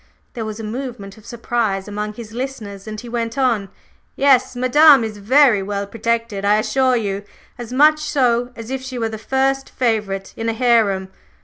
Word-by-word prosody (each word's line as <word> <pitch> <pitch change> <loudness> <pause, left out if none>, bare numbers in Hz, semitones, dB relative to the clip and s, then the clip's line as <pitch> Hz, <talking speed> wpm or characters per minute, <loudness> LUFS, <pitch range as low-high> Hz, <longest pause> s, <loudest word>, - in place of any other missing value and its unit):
There 225 -2 -5
was 215 0 -6
a - - -6
movement 225 -3 -6
of 220 - -18
surprise 225 -5 -2
among 210 +1 -4
his 225 -2 -9
listeners, 225 -5 -6
and 215 0 -6
he 245 - -10
went 230 +1 -3
on: 235 -7 +1 0.5
"Yes; 270 -3 +3
Madame 275 +2 +6
is 215 -2 -5
very 245 0 +4
well 200 +1 -3
protected, 230 -1 -2
I 205 +1 +4
assure 255 +3 +1
you, 200 -4 -2 0.4
as 240 -1 -7
much 305 +4 +5
so 250 -5 +1
as 230 +2 -8
if 265 -1 -3
she 260 -1 -7
were 225 -2 -1
the 220 -1 -7
first 270 +4 0
favorite 210 -5 -2
in 225 0 -2
a - - 0
harem. 220 -6 +2
230 Hz, 185 wpm, -19 LUFS, 210-255 Hz, 0.5 s, Madame